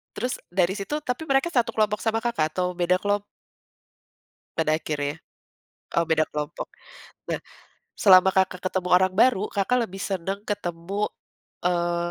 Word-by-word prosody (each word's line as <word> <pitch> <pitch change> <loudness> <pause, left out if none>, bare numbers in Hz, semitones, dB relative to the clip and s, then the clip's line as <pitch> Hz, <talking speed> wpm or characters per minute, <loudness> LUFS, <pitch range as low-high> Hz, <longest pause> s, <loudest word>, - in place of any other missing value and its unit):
Terus 250 +3 -2
dari 180 +1 +2
situ 215 +9 -3
tapi 250 +2 -3
mereka 275 +3 +2
satu 235 -2 +3
kelompok 215 -1 0
sama 225 0 +1
Kakak, 195 -10 0
atau 180 +1 -1
beda 180 +1 +2
kelom 205 +1 0 1.3
Pada 155 -1 +2
akhirnya? 145 -1 -3 0.8
Oh 170 - +4
beda 160 -1 +3
kelompok. 150 -1 -4 0.6
Nah, - - -1 0.6
selama 190 -2 +7
Kakak, 190 -1 +1
ketemu 185 -1 -1
orang 185 +1 +5
baru, 210 0 +4
Kakak 230 +4 +1
lebih 195 +1 -9
seneng 195 +1 -2
ketemu, 195 0 -2 0.6
eee, 175 -1 +1
190 Hz, 140 wpm, -25 LUFS, 175-210 Hz, 1.3 s, selama